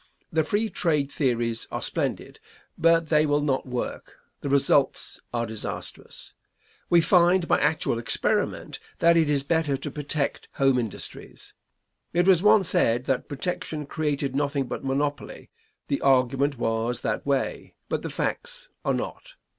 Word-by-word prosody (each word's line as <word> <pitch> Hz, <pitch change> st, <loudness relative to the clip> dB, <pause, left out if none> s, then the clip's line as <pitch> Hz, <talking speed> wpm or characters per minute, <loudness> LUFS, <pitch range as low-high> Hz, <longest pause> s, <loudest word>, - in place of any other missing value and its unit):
The 160 Hz, 0 st, +3 dB
free 205 Hz, +8 st, 0 dB
trade 150 Hz, -5 st, 0 dB
theories 120 Hz, -4 st, 0 dB
are -, -, -2 dB
splendid, -, -, -2 dB, 0.4 s
but 165 Hz, -1 st, +3 dB
they 155 Hz, -1 st, +4 dB
will 145 Hz, 0 st, +1 dB
not 135 Hz, -2 st, 0 dB
work; 125 Hz, -1 st, -5 dB, 0.2 s
the 140 Hz, -, -4 dB
results 140 Hz, 0 st, +2 dB
are 120 Hz, -1 st, -1 dB
disastrous. 110 Hz, -2 st, -6 dB, 0.6 s
We 170 Hz, -1 st, +6 dB
find 175 Hz, +1 st, +4 dB
by -, -, +3 dB
actual 155 Hz, -7 st, +1 dB
experiment 115 Hz, -, -1 dB, 0.2 s
that 170 Hz, 0 st, +4 dB
it 160 Hz, -3 st, +3 dB
is 140 Hz, -2 st, +1 dB
better 155 Hz, -2 st, 0 dB
to -, -, -6 dB
protect 150 Hz, -1 st, -3 dB
home 135 Hz, -2 st, +3 dB
industries. 115 Hz, -5 st, -6 dB, 0.6 s
It 175 Hz, +1 st, +3 dB
was 185 Hz, -3 st, +6 dB
once 210 Hz, -2 st, +5 dB
said 120 Hz, +2 st, +2 dB
that 130 Hz, -1 st, -1 dB
protection 150 Hz, 0 st, -4 dB
created 145 Hz, -2 st, -2 dB
nothing 140 Hz, -1 st, 0 dB
but -, -, -6 dB
monopoly; 135 Hz, -3 st, -3 dB, 0.4 s
the 140 Hz, -, -1 dB
argument 135 Hz, +1 st, +2 dB
was 115 Hz, +1 st, -1 dB
that -, -, -2 dB
way, 140 Hz, -2 st, -2 dB
but -, -, -2 dB
the -, -, -5 dB
facts -, -, -3 dB
are -, -, +1 dB
not. -, -, -6 dB
145 Hz, 145 wpm, -25 LUFS, 130-165 Hz, 0.6 s, We